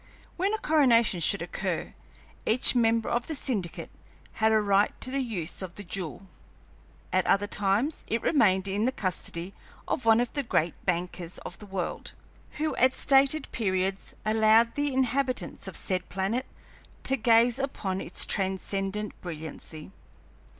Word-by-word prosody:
When 380 +3 0
a - - -2
coronation 240 - +3
should 170 +3 +1
occur, 175 - -3 0.5
each 235 +4 +4
member 230 -2 +2
of 240 0 -1
the 315 - -3
syndicate 210 - -3 0.5
had 220 0 +5
a 220 - +5
right 200 -1 +2
to 255 - -1
the 275 - 0
use 195 -10 -3
of 185 -2 -7
the 205 - -7
jewel; 185 0 -5 0.9
at - - +2
other 200 +1 +3
times 205 +9 0
it 230 - -1
remained 190 - +3
in 200 +3 0
the 255 - +2
custody 185 -3 -3 0.3
of - - -1
one 225 0 +5
of 245 0 -1
the 285 - 0
great 170 - 0
bankers 175 -1 -2
of 175 - -7
the 210 - -11
world, 190 -3 -4 0.4
who 310 +1 -2
at 260 +1 +4
stated 275 +3 +3
periods 190 -3 -1
allowed 220 +1 +4
the 290 0 -1
inhabitants 260 0 -1
of - - -6
said 185 -2 -2
planet 195 +8 -1 0.6
to 270 - +1
gaze 235 +1 +4
upon 195 -8 -2
its - - -3
transcendent 195 +1 -2
brilliancy. 160 0 -7
215 Hz, 150 wpm, -28 LUFS, 190-250 Hz, 0.9 s, had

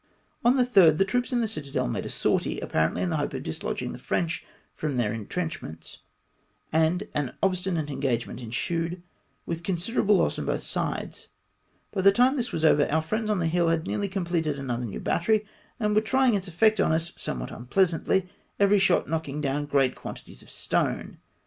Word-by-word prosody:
On 240 +2 +5
the 250 - +4
3rd 185 -10 +6
the 195 - +4
troops 245 +6 -1
in 245 -1 +2
the 225 - +1
citadel 145 - -3
made - - -3
a - - -6
sortie, - - 0
apparently 80 0 0
in 180 - 0
the 160 - +1
hope 145 -2 -2
of 130 - -4
dislodging 80 - -3
the - - -8
French 170 -1 -1 0.3
from 150 -4 -3
their 110 -3 +1
intrenchments, 115 - -5 0.7
and 160 +6 +2
an 145 -4 -2
obstinate 180 -5 0
engagement 130 -4 -2
ensued, 165 +9 -3 0.4
with 165 0 -3
considerable 195 +4 +1
loss - - +1
on - - -4
both - - -1
sides. - - -3 0.7
By 195 - 0
the 195 +1 +7
time 250 +6 +4
this 250 -4 -2
was 160 - 0
over, 145 -2 +4
our 160 +1 +2
friends 215 +6 -2
on 210 - +2
the 170 - 0
hill 170 +1 +2
had 165 0 +1
nearly 205 -1 -1
completed 170 -6 -1
another 125 -3 -3
new 105 - -5
battery, 215 +4 +1 0.3
and 210 -2 +1
were 215 - +4
trying 260 +2 +3
its 195 -2 -1
effect 215 +5 +3
on 195 - +3
us 165 +2 0
somewhat - - -4
unpleasantly, 180 +7 +1 0.3
every 200 0 +5
shot 190 -2 +3
knock 160 -1 -2
ing 140 +2 -4
down 145 0 -1
great 135 -3 +2
quantities - - -9
of - - -17
stone. - - -1
170 Hz, 190 wpm, -27 LUFS, 145-200 Hz, 0.7 s, the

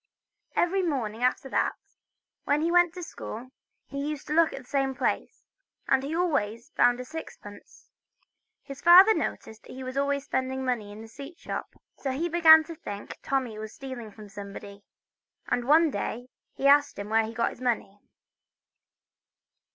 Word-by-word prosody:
Every 380 +3 +2
morning 245 - -2
after 255 +2 +1
that, - - 0 0.7
when 290 +1 +2
he 335 - +1
went 350 -1 +4
to 360 - -6
school, 255 -5 -8 0.3
he 280 0 -5
used 300 -2 -5
to - - -3
look 330 0 +4
in 275 - -8
the - - -24
same 270 -1 0
place, - - -2 0.4
and 265 - +3
he 285 +4 -4
always 235 -10 -1
found 245 0 +3
a 250 - -6
sixpence. 245 -9 -11 0.8
His 275 -1 -9
father 370 +5 +9
noticed 220 - -5
he 260 +1 -8
was 255 +1 -6
always 280 0 0
spending 260 0 -2
money 230 -5 -2
in 210 +1 -10
the - - -11
sweet 280 +8 -11
shop, - - -6 0.2
so 275 - -3
he 305 +7 -1
began 320 -2 +8
to 330 +1 -8
think 205 -11 -8
Tommy 255 -6 -2
was 220 0 -8
stealing 260 -5 -7
from 210 0 -12
somebody, 200 0 -9 0.7
and 245 -1 0
one 310 +3 +5
day 245 +3 -4 0.3
he 275 - -4
asked 285 +1 +5
him 200 +1 -6
where 225 0 +3
he 225 - -7
got 230 0 0
the 255 - -12
money. 215 -5 -1
265 Hz, 170 wpm, -27 LUFS, 225-310 Hz, 0.8 s, father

